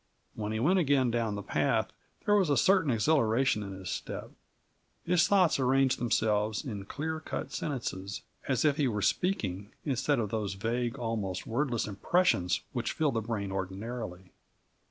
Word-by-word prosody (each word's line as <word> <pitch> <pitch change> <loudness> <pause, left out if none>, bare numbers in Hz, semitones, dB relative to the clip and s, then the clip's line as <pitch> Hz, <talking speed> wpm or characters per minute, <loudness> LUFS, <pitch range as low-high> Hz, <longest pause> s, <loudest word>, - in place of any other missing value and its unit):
When 105 -1 -4
he 110 - -1
went 180 +10 +3
again 135 -6 +3
down 115 -3 0
the 100 - -5
path, - - +1 0.3
there 205 - +3
was 195 -6 +4
a 145 - +3
certain 185 +1 +4
exhilaration 120 -1 +2
in 100 -1 -6
his 95 -1 -6
step. - - -5 0.7
His 175 0 +4
thoughts 185 -7 +4
arranged 130 0 +3
themselves 110 -1 +1
in 105 -7 -5
clear 160 +7 -3
cut 155 - -5
sentences, 105 -6 -4 0.2
as 130 0 +1
if 145 -1 +3
he 145 -4 +2
were 105 -4 -1
speaking, 105 - 0
instead 140 +1 +1
of 110 -4 -1
those 105 -3 -2
vague, 115 +4 -1
almost 105 -6 -3
wordless 120 0 0
impressions 100 - +1
which - - -2
fill 155 -3 +1
the 115 - -1
brain 105 -3 -3
ordinarily. 95 0 -5
115 Hz, 160 wpm, -30 LUFS, 105-145 Hz, 0.7 s, was